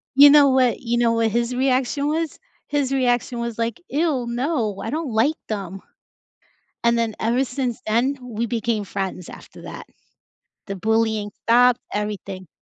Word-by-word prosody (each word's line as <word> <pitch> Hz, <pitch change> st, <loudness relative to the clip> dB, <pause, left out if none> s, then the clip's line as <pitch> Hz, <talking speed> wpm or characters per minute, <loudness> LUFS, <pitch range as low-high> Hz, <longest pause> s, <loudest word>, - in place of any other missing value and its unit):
you 285 Hz, +1 st, +9 dB
know 290 Hz, -1 st, +7 dB
what 260 Hz, -2 st, +2 dB
you 240 Hz, -1 st, -1 dB
know 235 Hz, -1 st, +3 dB
what 230 Hz, -1 st, +2 dB
his 235 Hz, +2 st, -1 dB
reaction 260 Hz, +2 st, +1 dB
was? 320 Hz, +1 st, -2 dB, 0.3 s
His 285 Hz, -2 st, 0 dB
reaction 245 Hz, -2 st, 0 dB
was 235 Hz, -1 st, -4 dB
like, 230 Hz, +7 st, -2 dB
"Ew, 290 Hz, -4 st, 0 dB
no, 240 Hz, -, -1 dB
I 225 Hz, -, -3 dB
don't 310 Hz, -2 st, -3 dB
like 260 Hz, +9 st, +2 dB
them." 195 Hz, -3 st, -5 dB, 1.0 s
And 235 Hz, 0 st, +3 dB
then 225 Hz, -2 st, -1 dB
ever 240 Hz, +4 st, +1 dB
since 250 Hz, -2 st, -3 dB
then, 245 Hz, +6 st, +1 dB
we 235 Hz, -2 st, -3 dB
became 225 Hz, -2 st, -1 dB
friends 190 Hz, -2 st, -4 dB
after -, -, -13 dB
that. -, -, -9 dB, 0.8 s
The 195 Hz, -1 st, -5 dB
bullying 220 Hz, 0 st, 0 dB
stopped, 245 Hz, +2 st, +5 dB
everything. 200 Hz, -3 st, -4 dB
235 Hz, 155 wpm, -22 LUFS, 220-265 Hz, 1.0 s, you